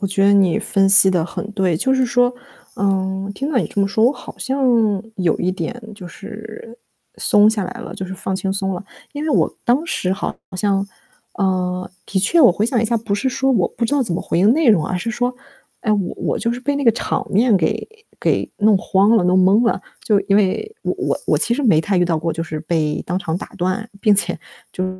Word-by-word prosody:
我 200 - -1
觉 195 +1 +1
得 200 - +5
你 190 -4 +3
分 195 -1 +1
析 190 0 +6
得 175 -3 +1
很 190 +4 -6
对， 190 -5 +1
就 265 +11 +1
是 260 -1 +2
说 245 +1 +2 0.4
嗯， 195 0 -1
听 275 +6 -3
到 270 - +2
你 185 - 0
这 200 - -3
么 195 - +3
说， 220 +3 +1
我 250 - +4
好 - - -11
像 270 0 -1 0.5
有 180 -4 +1
一 180 - 0
点 185 +7 -5
就 190 -3 -10
是 220 +5 -10 0.4
松 210 +1 +4
下 210 -3 -2
来 - - -7
了， - - -8
就 190 - -5
是 190 - -6
放 190 +1 -4
轻 190 0 -2
松 195 -1 -2
了。 180 - -7 0.3
因 290 0 -5
为 - - -2
我 - - +2
当 255 +7 +2
时 185 - -1
好 190 - -3 0.2
像 195 0 0 0.5
啊， 185 -2 -1 0.2
的 195 - -1
确 330 - +3
我 255 - +8
回 205 - -1
想 235 0 +1
一 - - 0
下， 230 +1 +1
不 215 -2 -2
是 205 +6 -1
说 265 +1 0
我 200 -9 +2
不 235 - -4
知 230 - -2
道 285 -2 +3
怎 210 -8 -3
么 - - -3
回 - - -1
应 200 +5 +5
内 310 0 +2
容， 180 -9 +4
而 185 - -2
是 180 +6 -3
说， 245 +3 -1 0.5
哎， 215 - 0
我 200 -4 -1
我 - - -2
就 235 - -1
是 245 - -6
被 285 +3 -1
那 285 - -2
个 230 - +7
场 235 - -3
面 220 +2 +3
给 160 - -1 0.3
给 - - 0
弄 210 -1 +4
慌 195 +3 +2
了、 185 - +2
弄 185 +1 +3
懵 205 +6 +4
了。 - - +1 0.2
就 210 -2 +2
因 200 - +1
为 210 - 0
我 - - -2
我 - - +2
其 235 - 0
实 275 +5 -1
没 205 - +4
太 195 +4 -1
遇 175 - +3
到 170 -2 0
过， 165 +1 -2
就 165 +1 -4
是 155 -2 -5
被 155 -2 -1
当 180 - -2
场 165 -3 -3
打 185 - -7
断， 185 +6 -2
并 210 -2 +4
且 180 -3 0 0.3
就 185 - -2
200 Hz, 260 characters per minute, -19 LUFS, 185-230 Hz, 0.5 s, 我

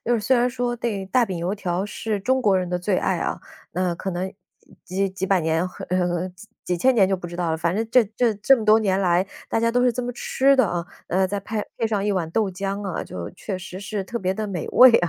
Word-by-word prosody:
就 240 - +2
是 225 - +1
虽 260 +5 +3
然 245 +1 +3
说 245 -1 -2
这 220 -4 -2
大 250 -3 +4
饼 185 -3 -4
油 175 +4 -1
条 185 -2 -2
是 210 0 -3
中 260 +6 +1
国 200 -5 +3
人 180 -1 -2
的 180 - 0
最 185 +1 0
爱 - - +1
啊， - - -2 0.3
那 180 -1 0
可 190 +3 -4
能 185 +1 -3 0.5
几 195 +2 -1
几 190 0 -3
百 190 -2 +3
年 160 +1 +1 0.3
呃， 180 -1 +1
几 185 +4 -15 0.2
几 180 - 0
千 260 +7 +4
年 200 -5 +5
就 195 - +1
不 175 -1 -7
知 175 0 -8
道 175 -2 -1
了， 160 - 0
反 170 +3 0
正 225 +1 0
这 250 -1 +6
这 240 -2 +3
这 265 +6 +5
么 220 - -4
多 215 +1 +6
年 195 -3 +1
来 180 0 +2 0.2
大 225 - +1
家 230 0 +2
都 245 +1 +2
是 245 - +4
这 250 +2 -3
么 245 - -3
吃 275 +3 +2
的 260 - +5
啊， 175 -2 -2 0.2
呃， 190 +1 +2
再 205 - -2
派 210 +2 -3
配 225 - 0
上 210 -3 0
一 210 - +1
碗 170 -4 -1
豆 215 0 +1
浆 195 +2 -3
啊， 185 - -3
就 85 -1 -6
确 190 -3 -5
实 185 0 -8
是 205 0 -3
特 235 +5 -4
别 185 -2 0
地， 215 +2 -3
美 180 -5 -4
味 255 0 +8
啊， 175 -6 +4
195 Hz, 290 characters per minute, -23 LUFS, 180-225 Hz, 0.5 s, 味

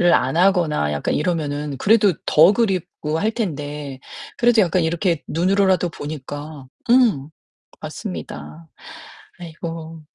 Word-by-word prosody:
안 130 +4 0
하거나 170 - +2
약간 75 - -2
이러면은 150 -3 -2
그래도 205 -3 +4
더 165 +6 +6
그립고 185 -8 -1
할 215 - +1
텐데. 145 - -5 0.4
그래도 240 -2 +4
약간 175 +1 +1
이렇게 165 0 0
눈으로라도 185 +1 +2
보니까 145 -1 -7 0.2
음 225 - +3 0.5
맞습니다. 75 +3 -8 0.7
아이고. 165 -1 -7
160 Hz, 260 characters per minute, -21 LUFS, 145-185 Hz, 0.7 s, 더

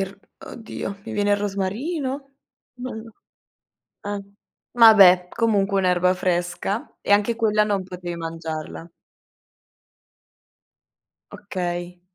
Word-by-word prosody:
Il 195 - 0
r 195 - -13 0.3
oddio, 220 -3 -7
mi - - -7
viene 205 0 0
il 205 - +4
rosmarino? 260 - -3 0.5
Ma 255 - -4
no 220 0 -9 0.9
ehm, 200 -1 -6 0.4
ma 230 -2 +8
beh, 180 -3 +7
comunque 200 -3 +1
un'erba 180 -1 +2
fresca, 180 +3 -2
e - - -2
anche 210 +3 +2
quella 215 -2 +3
non 205 -2 -1
potev 180 -2 -7
mangiarla. 165 0 -6 2.4
Okay. 175 -2 -5
195 Hz, 110 wpm, -23 LUFS, 180-220 Hz, 2.4 s, ma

